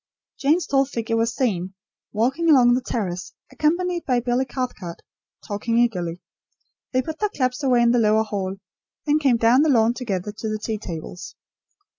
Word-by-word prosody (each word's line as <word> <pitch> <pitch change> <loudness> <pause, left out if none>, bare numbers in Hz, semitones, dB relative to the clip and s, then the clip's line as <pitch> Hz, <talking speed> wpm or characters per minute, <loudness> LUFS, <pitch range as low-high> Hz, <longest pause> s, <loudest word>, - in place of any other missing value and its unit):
Jane's 310 +6 +2
tall 275 -1 +2
figure 230 -4 -3
was 230 +1 0
seen, 190 -7 -1 0.4
walking 265 +10 +1
along 250 -5 +6
the 250 - +1
terrace, 185 -8 -4 0.2
accompanied 345 +6 0
by 250 -3 +1
Billy 245 +2 0
Cathcart, 245 -10 -5 0.4
talking 220 +3 -1
eagerly. 180 -8 0 0.7
They 255 0 +1
put 315 +1 -6
their 420 - +1
clubs 255 -5 -2
away 250 -3 +4
in 235 - +4
the 245 - +3
lower 220 0 +3
hall; 195 -3 -3 0.5
then 300 0 +3
came 270 -5 +3
down 230 +4 +4
the 310 - +3
lawn 230 -3 +4
together 210 -6 -3
to 220 +1 -5
the 215 - -2
tea 215 0 -4
tables. 175 -2 -7
240 Hz, 170 wpm, -23 LUFS, 215-270 Hz, 0.7 s, along